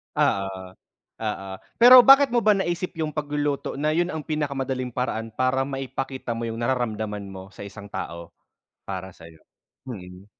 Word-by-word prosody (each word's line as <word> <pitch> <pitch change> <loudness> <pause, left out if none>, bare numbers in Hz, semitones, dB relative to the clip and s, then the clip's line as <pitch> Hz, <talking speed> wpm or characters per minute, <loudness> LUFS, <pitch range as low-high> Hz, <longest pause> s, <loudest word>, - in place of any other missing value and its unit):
Oo, 100 0 +2 0.8
oo. 100 -3 -3 0.3
Pero 250 +2 +10
bakit 275 +1 +8
mo 240 -3 +2
ba 215 - +6
naisip 185 -2 -1
'yong 155 -1 -2
pagluluto 145 -2 -2
na 155 +1 +1
'yon 175 +2 +1
ang 160 - -3
pinakamadaling 135 -4 -2
paraan 115 -2 -3
para 130 +3 +1
maipakita 135 -2 -4
mo 115 - -3
'yong 115 0 -4
nararamdaman 110 -4 -2
mo 95 0 -9
sa 100 - -10
isang 100 +1 -10
tao? 85 -3 -7 0.5
Para 95 -1 -6
sa'yo. 80 -1 -15 0.5
Mm. 95 -4 -9
130 Hz, 150 wpm, -24 LUFS, 100-150 Hz, 0.8 s, Pero